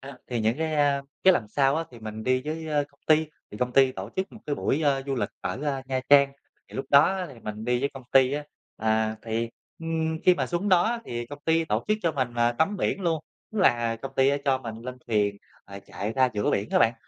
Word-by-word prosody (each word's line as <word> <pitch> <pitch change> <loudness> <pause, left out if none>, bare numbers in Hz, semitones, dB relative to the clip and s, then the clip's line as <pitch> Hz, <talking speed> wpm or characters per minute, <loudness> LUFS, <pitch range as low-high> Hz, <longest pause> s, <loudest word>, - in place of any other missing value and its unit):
A, 135 0 -10
thì 120 -2 -2
những 110 +2 +1
cái, 160 -1 -1
a, 145 -2 +2 0.2
cái 190 - +8
lần 110 - -1
sau 135 +5 +2
á 165 - -1
thì 120 - -12
mình 110 0 -7
đi 130 0 +2
với, 160 +1 -4
ơ, 150 -2 +1
công 140 - -31
ty. 155 0 +4 0.2
Thì 105 - -9
công 125 0 -1
ty 135 0 +5
tổ 95 0 -7
chức 190 +1 -2
một 220 - -12
cái 145 - 0
buổi, 145 +2 0
a, 140 -2 +2
du 135 0 -2
lịch 125 - -1
ở, 135 - -4
a, 135 -2 -1
Nha 130 -1 -1
Trang, 140 -1 +6 0.4
thì - - -15
lúc 135 - -2
đó 140 - +9
á 190 -1 0
thì 120 - -14
mình 105 0 -6
đi 125 +1 +1
với 140 - +1
công 135 - -8
ty 130 0 +5
á. 145 +1 -2 0.3
À, 110 0 +1
thì, 115 +1 -2 0.3
ừm, 160 -1 -2
khi 180 - +7
mà - - -1
xuống 175 +4 -1
đó 180 -3 +5
á 235 +3 0
thì 120 - -4
công 145 +4 -9
ty 165 0 +2
tổ - - -1
chức 215 0 +2
cho 165 -2 +1
mình, 130 -4 -2
à, 120 0 +2
tắm 160 +11 +1
biển 200 - -1
luôn, 165 -4 0 0.3
tức 220 - -3
là 120 - +3
công 135 +4 -7
ty 135 0 +5
á 140 - +2
cho 135 -2 +2
mình 115 -3 -7
lên 125 +1 -6
thuyền, 105 -3 +1 0.3
ờ, 100 0 -9
chạy 105 +3 -4
ra 130 +1 +3
giữa 105 - +1
biển 100 +2 -1
á - - +3
bạn, 115 0 +4
135 Hz, 270 wpm, -26 LUFS, 120-160 Hz, 0.4 s, đó